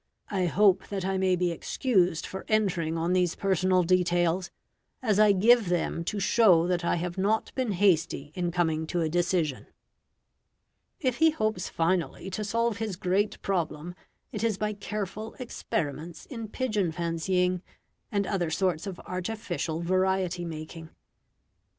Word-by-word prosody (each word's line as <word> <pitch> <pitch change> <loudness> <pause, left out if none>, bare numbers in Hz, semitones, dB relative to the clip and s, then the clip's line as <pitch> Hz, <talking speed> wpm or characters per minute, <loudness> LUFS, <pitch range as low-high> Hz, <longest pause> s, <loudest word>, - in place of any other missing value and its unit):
I 185 -3 +1
hope 190 +1 +3
that 195 -2 -3
I 190 0 0
may 185 -1 +3
be 180 -1 0
excused 180 -2 +1
for 190 - -6
entering 180 -7 +1
on 170 +2 0
these 180 -2 +2
personal 185 -1 +2
details, 175 0 +2 0.5
as 215 -5 +1
I 215 -1 +7
give 215 +1 +4
them 175 -1 -1
to 205 +3 -2
show 190 -4 +5
that 180 -1 0
I - - +1
have 175 +2 -3
not 210 +3 0
been 255 -6 -1
hasty 170 -6 +1
in 175 0 -1
coming 160 -2 0
to 175 +1 -1
a 160 - 0
decision." 170 -4 0 1.3
If 255 -4 0
he 320 0 +5
hopes 215 - -1
finally 170 +1 -1
to 210 +3 -3
solve 230 +1 0
his 220 -3 -3
great 195 +3 0
problem, 170 -3 -2 0.4
it - - -4
is 225 -4 +1
by 210 +1 -1
careful 210 +1 -5
experiments 165 - -4
in 230 -5 -6
pigeon 210 -7 -1
fancying, 180 +2 0 0.5
and 200 -1 +1
other 185 -4 -1
sorts 170 +1 0
of 190 -3 -6
artificial 180 -4 -3
variety 185 0 0
making. 160 0 -7
185 Hz, 150 wpm, -28 LUFS, 170-205 Hz, 1.3 s, I